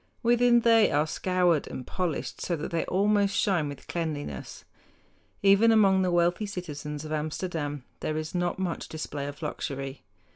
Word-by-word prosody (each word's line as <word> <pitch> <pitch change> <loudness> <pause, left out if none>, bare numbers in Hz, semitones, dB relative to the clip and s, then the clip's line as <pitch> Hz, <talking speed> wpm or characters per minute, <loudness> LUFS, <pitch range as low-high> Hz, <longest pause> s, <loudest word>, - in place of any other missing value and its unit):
Within 240 0 +4
they 230 -2 +5
are 150 +1 +2
scoured 175 -1 +1
and 125 - -7
polished 180 -5 -3
so 175 - -1
that 155 - -5
they 165 -1 0
almost 200 +1 +2
shine 175 -7 +1
with 140 - -9
cleanliness. 150 - -5 0.8
Even 200 +3 +6
among 195 -4 +5
the 185 - +1
wealthy 175 +4 +2
citizens 150 -6 -6
of 155 - -7
Amsterdam 150 -2 -3 0.2
there 155 - -2
is 155 0 -4
not 175 -1 -1
much 185 -3 -3
display 145 -2 -5
of 145 +3 -8
luxury. 135 -2 -4
170 Hz, 155 wpm, -27 LUFS, 150-195 Hz, 0.8 s, Even